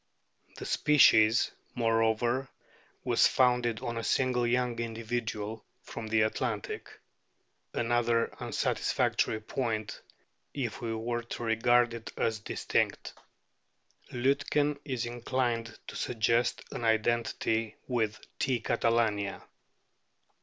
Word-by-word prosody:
The - - -6
species, 115 -6 +5 0.2
moreover, 115 +2 +1 0.5
was - - +4
"founded 125 -3 +2
on 120 -1 -3
a 115 - -3
single 125 -1 +1
young 125 -1 0
individual 115 -2 -3 0.2
from 115 -1 -7
the 110 0 +3
Adriatic 110 -1 -2 0.4
" - - -46
another 120 0 +1
unsatisfactory 110 - 0
point, 110 -2 -3 0.5
if 125 -6 -3
we 115 -1 -2
are 120 +2 -2
to 120 0 -6
regard 120 +1 +3
it 115 -1 -7
as 110 -1 0
distinct. 105 - -1 1.0
Liitken 140 +3 +1
is 130 -5 -2
inclined 120 -1 -2
to - - -9
suggest 115 +1 +1
an - - -5
identity 115 0 +1
with 110 -4 -1 0.2
T. 130 -2 +1
catalania. 115 -3 0
115 Hz, 105 wpm, -30 LUFS, 110-120 Hz, 1.0 s, species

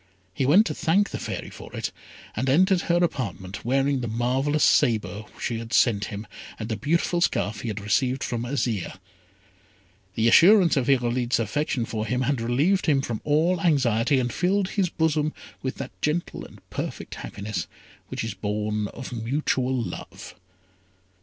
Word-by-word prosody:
He 130 - 0
went 190 +10 +6
to - - -2
thank 195 +5 +1
the - - -4
Fairy - - -5
for - - -11
it, - - -3 0.4
and 130 +5 -1
entered 185 +6 +4
her 170 - +1
apartment, 100 - -3
wearing 135 +2 +1
the 120 - -3
marvellous 130 +6 0
sabre 110 -5 +2
she 115 -2 -2
had 115 +1 -7
sent 105 -4 +3
him, 105 +1 -6 0.3
and 110 0 -5
the 110 - -1
beautiful 170 - 0
scarf 100 - 0
he - - -5
had 105 -2 -3
received 125 +6 0
from 120 -1 -2
Azire. 120 -8 -2 1.2
The 115 +1 +2
assurance 180 - +7
of 135 -1 0
Irolite's 125 -1 +2
affection 120 +2 -1
for 110 -1 -3
him 125 +3 0
had 130 -1 0
relieved 145 +13 +1
him 140 -3 +3
from 115 -4 -3
all 160 +4 +2
anxiety, 135 -5 +2
and 120 -2 -1
filled 190 +2 +1
his 190 -4 0
bosom 155 -2 0 0.3
with 130 - -3
that - - -6
gentle 160 +3 -2
and - - -16
perfect - - -5
happiness 100 0 -5 0.4
which - - -4
is 115 -2 -3
born 105 +1 -2
of 125 +4 -8
mutual 130 +2 -1
love. 120 -3 -6
125 Hz, 165 wpm, -25 LUFS, 115-150 Hz, 1.2 s, assurance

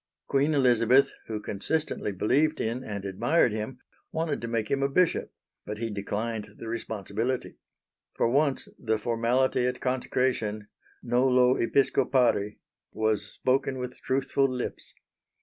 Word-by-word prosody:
Queen 140 +3 +2
Elizabeth, 125 0 +4
who 110 -1 -3
consistently 105 +4 -2
believed 140 - +1
in 115 +3 -2
and 100 -4 -5
admired 120 - +2
him, 110 +4 -4 0.3
wanted 160 -2 -2
to 115 - -4
make 115 -2 -2
him 135 - +1
a 140 - +2
bishop, 175 +4 +1 0.3
but 105 - -5
he 115 0 -3
declined 105 +1 -4
the 115 - -8
responsibility. 115 +2 -3 0.6
For - - +2
once 140 +2 +2
the 110 -1 0
formality 120 +3 +1
at 125 0 -2
consecration: 125 -5 -1 0.3
"Nolo 125 +1 +4
Episcopari" 125 -4 +2 0.3
was 110 -2 0
spoken 130 +4 0
with 125 -1 -6
truthful 135 +1 +1
lips. 125 -1 -5
120 Hz, 130 wpm, -27 LUFS, 110-130 Hz, 0.6 s, Elizabeth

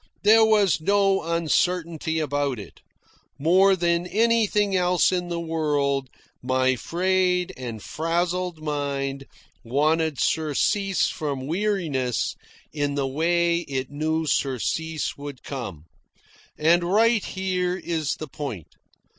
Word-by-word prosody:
There 220 +2 +7
was 205 -7 +3
no 195 +2 +2
uncertainty 170 0 0
about 145 -3 -1
it. 100 - -11 0.6
More 190 +6 +4
than 170 0 0
anything 210 -1 +2
else 180 0 +3
in 180 -1 -1
the 170 -1 -2
world, 145 -5 -1 0.3
my 130 0 +1
frayed 180 +4 0
and 120 -4 -7
frazzled 170 +1 -2
mind 140 -2 -3 0.4
wanted 150 +3 +1
surcease 175 +5 +1
from 140 -4 -3
weariness 160 - -1 0.4
in 145 -2 -1
the 140 -1 0
way 170 +5 +1
it 135 -5 -4
knew 160 +2 -1
surcease 150 +3 -1
would 140 -2 -8
come. 100 - -6 0.7
And 170 +3 +3
right 215 +4 +3
here 185 -1 -2
is 160 -5 -2
the 155 - -7
point. 130 - -7
160 Hz, 115 wpm, -24 LUFS, 140-180 Hz, 0.7 s, There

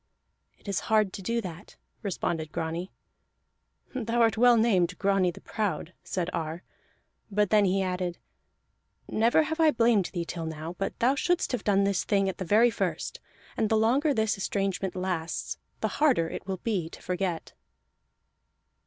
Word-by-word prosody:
"It - - -21
is 200 -2 0
hard 215 -3 +3
to - - -6
do 230 +5 -1
that," 180 0 -9 0.3
responded 170 -6 -2
Grani. 165 +3 -3 1.0
"Thou 240 -2 -1
art 225 -3 +4
well 240 +1 +6
named 195 -5 +2
Grani 195 -2 +2
the 175 - -8
Proud," 185 -5 -3
said 180 -3 -2
Ar; 165 +1 -3 0.7
but 205 -1 +1
then 210 -2 +5
he 190 +1 +2
added: 180 -1 -2 0.9
"Never 230 +8 +3
have 320 +2 -3
I 320 -1 +6
blamed 230 - +3
thee 170 -2 -3
till 165 -1 -5
now, 160 +1 -5
but 195 - -2
thou 250 +3 +3
shouldst 350 +5 0
have 250 - -2
done 200 -1 +3
this 200 -1 +1
thing 195 -2 +2
at 190 - -3
the 185 - -3
very 225 +6 +5
first. - - -3 0.4
And 220 -2 +1
the 220 - +3
longer 260 +8 +3
this 220 -5 +1
estrangement 195 -1 -1
lasts, 180 -3 -3 0.2
the - - +2
harder 255 - +4
it 175 - -7
will 190 -1 -2
be 190 -8 -1
to - - -12
forget." 180 -2 -2
195 Hz, 165 wpm, -28 LUFS, 180-225 Hz, 1.0 s, well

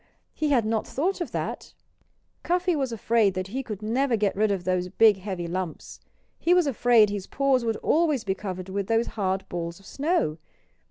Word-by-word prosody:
He 305 - -1
had 245 -6 +3
not 220 0 -1
thought 360 +7 -1
of 345 - -2
that. - - -5 0.7
Cuffy 360 0 +1
was 270 -4 -1
afraid 220 -2 +2
that 185 +1 -3
he 260 +6 -3
could 215 -5 -7
never 240 +2 +1
get 205 -2 0
rid 215 +2 +2
of 195 -3 -1
those 180 0 -1
big 210 +1 +5
heavy 185 -3 -5
lumps. 175 -1 -5 0.4
He 350 +1 +3
was 360 -2 +4
afraid 240 -5 +4
his 200 -2 -4
paws 270 -2 +1
would 225 -2 -1
always 305 -6 +2
be 195 - 0
covered 185 -2 -6
with 195 0 -3
those 225 +1 +2
hard 190 -2 -1
balls 170 0 -5
of 195 - -19
snow. 275 - -1
215 Hz, 195 wpm, -26 LUFS, 190-270 Hz, 0.7 s, big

